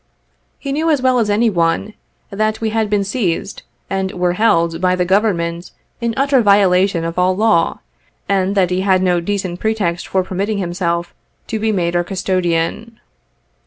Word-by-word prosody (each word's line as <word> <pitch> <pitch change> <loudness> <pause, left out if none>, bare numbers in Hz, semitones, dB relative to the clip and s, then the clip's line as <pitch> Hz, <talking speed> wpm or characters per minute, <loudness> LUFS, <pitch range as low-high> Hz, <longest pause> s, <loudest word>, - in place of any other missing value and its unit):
He 280 - -5
knew 315 +4 0
as 300 -3 +3
well 255 -1 +2
as 220 -3 0
any 220 +2 +2
one, 170 +4 0 0.4
that 215 +2 -1
we 220 -1 -2
had 220 -1 0
been 205 -1 +1
seized 195 -3 -2 0.3
and 190 -1 -2
were 180 -1 0
held 170 -5 +1
by 185 0 +2
the 180 -1 0
Government 175 -3 0 0.3
in 235 -1 -1
utter 275 -1 +3
violation 195 -4 +3
of 165 +2 -3
all 185 +1 +2
law, 210 -5 +1 0.5
and 195 0 0
that 185 -3 +2
he 180 +1 0
had 190 -1 +2
no 180 -1 +2
decent 185 -1 -3
pretext 200 -6 -1
for 190 -1 0
permitting 200 +3 -2
himself 175 -2 -2 0.3
to 220 - -4
be 220 +1 0
made 175 -4 -1
our 175 - +2
custodian. 185 +4 -2
190 Hz, 170 wpm, -17 LUFS, 175-215 Hz, 0.5 s, as